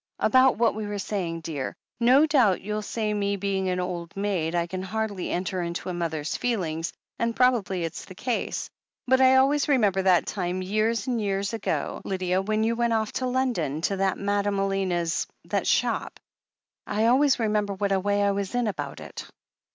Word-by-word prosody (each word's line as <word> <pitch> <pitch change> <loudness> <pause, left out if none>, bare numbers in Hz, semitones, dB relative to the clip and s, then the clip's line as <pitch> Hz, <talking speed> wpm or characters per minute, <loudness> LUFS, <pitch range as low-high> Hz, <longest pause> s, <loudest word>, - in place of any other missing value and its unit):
"About 260 0 +4
what 230 +1 +3
we 215 -1 -4
were 205 0 -3
saying, 185 -5 -3
dear. 150 -5 -4 0.2
No 255 +5 +6
doubt, 255 -12 +3
you'll 210 +1 -3
say, 215 0 -2
me 200 -1 0
being 195 -1 -1
an 180 0 -1
old 180 -1 -4
maid, 185 -5 -1
I 170 -1 +1
can 185 +2 -5
hardly 205 -1 -3
enter 185 +1 -2
into 170 +1 -4
a - - -2
mother's 160 -2 -2
feelings, 170 -9 -1 0.3
and 230 0 0
probably 225 -8 +2
it's 165 - -5
the 185 - -12
case. 245 +5 -2 0.4
But 260 +1 +3
I 260 0 +6
always 275 +2 +3
remember 210 -9 +3
that 185 -2 +4
time, 185 -1 -2
years 215 +3 0
and 245 -3 -1
years 200 +1 -1
ago, 225 - -2
Lydia, 185 -1 0
when 215 +2 0
you 230 +1 +1
went 235 0 +1
off 220 -1 0
to 255 - -2
London 240 - -1
to 195 +3 0
that 195 0 +1
Madame 200 0 0
Elena's, 190 -4 0 0.2
that - - -1
shop - - 0 0.4
— - - -67 0.3
I 215 +2 +1
always 265 +4 +4
remember 210 -3 0
what 200 0 -1
a 195 - +3
way 205 +1 +1
I 200 - +3
was 200 +3 -3
in 245 -1 +1
about 145 -10 -4
it. - - -8
200 Hz, 190 wpm, -26 LUFS, 185-230 Hz, 0.4 s, No